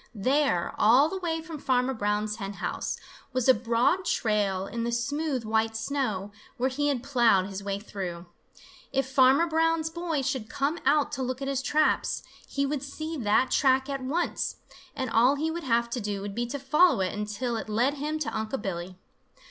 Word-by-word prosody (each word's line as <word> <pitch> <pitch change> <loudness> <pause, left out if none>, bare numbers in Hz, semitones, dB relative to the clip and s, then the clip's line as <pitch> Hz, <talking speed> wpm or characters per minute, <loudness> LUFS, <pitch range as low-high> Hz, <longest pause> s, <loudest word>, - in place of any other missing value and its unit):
There, 255 -4 +1
all 250 +8 +6
the 380 +2 -4
way 325 -3 -2
from 320 -2 -7
Farmer 255 -1 +1
Brown's 210 -1 -1
hen 200 -2 -5
house, 180 - -3 0.4
was 255 -1 0
a 260 - +8
broad 235 - +1
trail 205 - 0
in 230 +3 -4
the 235 - -1
smooth 280 +2 -1
white 220 0 +1
snow, 225 -5 -2 0.3
where 260 +2 0
he 290 +3 0
had 270 -4 0
plowed 235 -8 +3
his 195 0 -6
way 200 0 -2
through. 185 -4 -6 0.7
If 270 -1 0
Farmer 265 +4 +5
Brown's 325 0 +1
boy 330 -4 -2
should 260 -4 -2
come 290 +5 -1
out 295 +1 +3
to 265 - -3
look 255 0 -2
at 275 - -4
his 275 -1 -1
traps, 300 +3 +1 0.2
he 280 0 -1
would 280 -1 -2
see 310 +3 -5
that 235 +1 +2
track 265 -1 +3
at 275 -1 -3
once, 300 +7 -1 0.4
and 260 - -2
all 240 +4 +4
he 315 +3 -1
would 335 -1 -5
have 235 -1 +2
to 245 - -2
do 205 -1 -3
would 200 0 -5
be 240 +3 -2
to 270 +4 -4
follow 290 - +4
it 185 - -1
until 210 +4 -3
it 220 - -5
led 240 +6 +2
him 300 +2 -3
to 305 -1 -3
Unc' 220 +4 -2
Billy. 185 -2 -5
255 Hz, 195 wpm, -27 LUFS, 215-285 Hz, 0.7 s, a